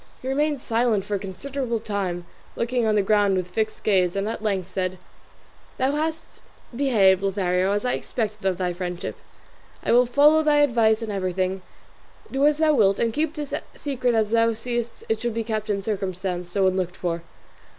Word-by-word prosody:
He - - -5
remained 290 +1 0
silent 230 -4 +1
for 210 - -4
a 200 - 0
considerable 235 +6 -3
time, 190 -5 -3 0.3
looking 240 -1 0
on 215 - +2
the 205 - +3
ground 205 -1 +3
with 180 -1 -2
fixed 215 +4 -2
gaze, 185 -4 +2
and 200 +1 -1
at 225 - -4
length 190 -4 -2
said, 185 0 -2 0.8
"Thou 260 +1 +2
hast 315 +2 -3 0.3
behaved, 210 -9 +4
Lothario, 190 -1 +1
as 205 +3 -1
I 250 - +1
expected 210 -4 -3
of 185 -2 0
thy 180 -1 -1
friendship: 180 0 -4 0.7
I - - 0
will 245 +1 +5
follow 295 +5 +5
thy 300 -1 +4
advice 230 -5 +3
in 220 - -4
everything; 185 -1 -1 0.7
do 275 +2 +3
as 300 -1 +2
thou 315 -1 +3
wilt, 200 -7 +4
and 230 -1 0
keep 310 +3 -1
this 295 -2 -5 0.2
secret 250 -4 -1
as 220 -1 +1
thou 230 0 +3
seest 235 +1 -4
it 220 -1 0
should 240 -2 -2
be 230 - -1
kept 215 -1 -3
in 200 -1 -1
circumstances 185 -3 -3
so 195 0 +2
unlooked 185 -1 0
for." 170 -1 -2
215 Hz, 185 wpm, -24 LUFS, 190-245 Hz, 0.8 s, will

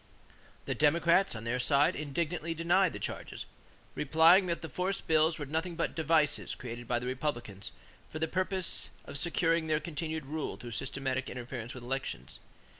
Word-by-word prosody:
The - - -1
Democrats, 170 +3 +3
on 115 - -6
their 120 +2 -1
side, 140 +3 +3
indignantly 165 +2 -2
denied 175 +2 +3
the - - -6
charges, - - -5 0.5
replying 165 +6 +5
that 170 -1 -2
the - - -3
force 180 +7 -1
bills 160 0 +3
were 145 - -4
nothing 160 +5 -2
but - - -1
devices 160 -2 +2
created 120 -1 -7
by 120 - +1
the 120 - -4
Republicans 125 -7 -3 0.4
for - - -6
the 160 +1 0
purpose 185 +1 0 0.2
of 140 - -5
securing 165 -1 +2
their 155 -1 +2
continued 160 -1 -4
rule 155 +2 -3
through 120 - -8
systematic 130 +2 -2
interference 120 -1 -6
with 125 - -8
elections. 135 +2 -4
155 Hz, 165 wpm, -31 LUFS, 130-165 Hz, 0.5 s, replying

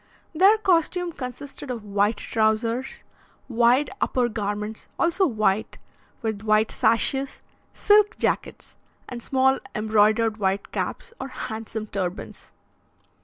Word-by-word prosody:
Their 385 +7 +5
costume 355 -3 +1
consisted 275 0 -8
of 235 -4 -4
white 205 +1 +1
trousers, 225 +4 -1 0.4
wide 245 +3 +3
upper 245 -2 +1
garments, 210 0 -4
also 345 +3 +2
white, 215 -4 0 0.5
with 220 -2 -2
white 215 0 +2
sashes, 270 +4 0 0.3
silk 420 0 +4
jackets, - - -2 0.3
and 245 -1 -7
small 265 +2 +2 0.2
embroidered 215 +1 +2
white 195 -1 -1
caps, 470 - -4
or 265 - -4
handsome 220 -4 -6
turbans. 190 -2 -5
230 Hz, 110 wpm, -24 LUFS, 215-270 Hz, 0.5 s, Their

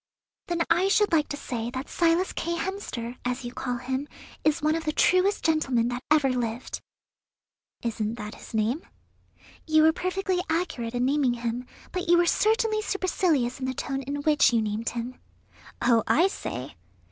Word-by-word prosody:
"Then 345 -1 +1
I 345 +3 +3
should 415 +1 +3
like 310 -3 +3
to 290 - -3
say 235 -4 -4
that 260 +2 -5
Silas 340 +2 +2
K. 340 +1 -2
Hemster, 290 - -4
as 250 +1 -2
you 240 - -5
call 245 -1 -2
him, 260 +3 -3 0.4
is 310 0 +3
one 310 +1 +3
of 325 0 -2
the 305 - +1
truest 370 +5 +3
gentlemen 265 -7 +2
that 245 +1 -3
ever 300 -3 +4
lived." 245 -1 -3 1.0
"Isn't 220 -1 -2
that 210 -2 -6
his - - -10
name?" 225 +8 +1 0.9
"You 310 0 +5
were 320 0 +6
perfectly 370 +1 -1
accurate 320 -9 -1
in 245 +1 +1
naming 270 -3 +2
him, 240 +1 -3 0.2
but 365 -1 -3
you 345 - +7
were 345 - +4
certainly 435 +3 +2
supercilious 340 - 0
in 260 - -2
the 260 - -2
tone 270 +2 -3
in 285 +2 -4
which 300 -4 +5
you 235 - +3
named 215 +1 -1
him." 240 +2 -5 0.6
"Oh, 230 -2 +5
I 350 +6 +4
say!" 130 - -5
280 Hz, 175 wpm, -26 LUFS, 240-340 Hz, 1.0 s, you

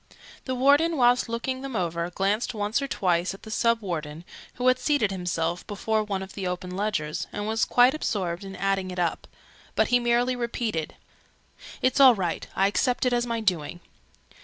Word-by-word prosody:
The 260 - -2
Warden, 290 +6 +4
whilst 245 -1 +3
looking 260 +3 -3
them 270 -3 -6
over, 170 -2 -1
glanced 200 +6 -1
once 210 +5 0
or 275 - -2
twice 180 -5 0
at - - -17
the 220 - -9
Sub 230 +1 +2
Warden, 160 -4 -5 0.3
who 250 - -4
had 255 0 +4
seated 280 -10 +1
himself 175 -2 -2
before 215 +1 -1
one 195 -2 -3
of 190 - -10
the 195 -2 -4
open 180 0 -4
ledgers, 190 -7 -2
and 205 - -4
was 220 +1 +1
quite 245 +2 +5
absorbed 190 - -2
in 195 0 -8
adding 195 -1 -1
it 180 - -7
up; 175 -2 -1 0.5
but - - +2
he 245 - +4
merely 240 +1 +1
repeated 235 -8 -3 0.9
"It's 255 - +2
all 260 -3 +8
right. 180 -4 -3
I 195 - +3
accept 245 +6 +1
it 250 - +2
as 240 0 +1
my 230 -1 -2
doing." 175 -5 -1
210 Hz, 185 wpm, -26 LUFS, 180-245 Hz, 0.9 s, all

